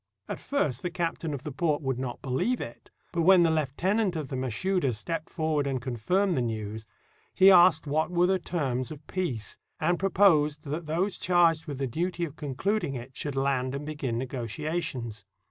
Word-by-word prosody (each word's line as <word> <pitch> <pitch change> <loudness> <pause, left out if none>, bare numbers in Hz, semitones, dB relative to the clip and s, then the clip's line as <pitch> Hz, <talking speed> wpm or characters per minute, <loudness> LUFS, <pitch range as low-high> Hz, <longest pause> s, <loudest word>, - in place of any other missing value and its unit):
At - - -4
first 145 - -1
the 180 - -2
captain 170 -2 -2
of 140 -3 -5
the 150 - -5
port 150 +2 0
would 130 -2 -1
not 130 -2 -5
beheve 140 - 0
it. 115 - -8 0.2
But 170 - 0
when 180 +1 +7
the 165 - +3
heutenant 175 +7 0
of 150 -5 -4
the - - -3
Mashouda 130 - 0
stepped 160 +9 -4
forward 155 -4 0
and 135 -2 -1
confirmed 135 - 0
the 130 - +1
news, 110 -1 -4 0.5
he 190 +1 +8
asked 175 -4 +6
what 155 +3 0
were 175 0 +3
the 190 +1 +2
terms 135 -8 -2
of 155 -2 -10
peace, 135 - -3 0.2
and 175 +2 +1
proposed 160 -7 +3
that 155 +3 -4
those 180 +6 -1
charged 170 -3 +3
with 145 -3 -4
the 135 - -1
duty 170 +7 -2
of 150 -2 -9
concluding 150 +3 -1
it 125 +1 -7
should 145 -2 -3
land 135 -1 0
and 140 +1 -5
begin 145 -6 -3
negotiations. 125 -1 -4
150 Hz, 185 wpm, -28 LUFS, 130-175 Hz, 0.5 s, he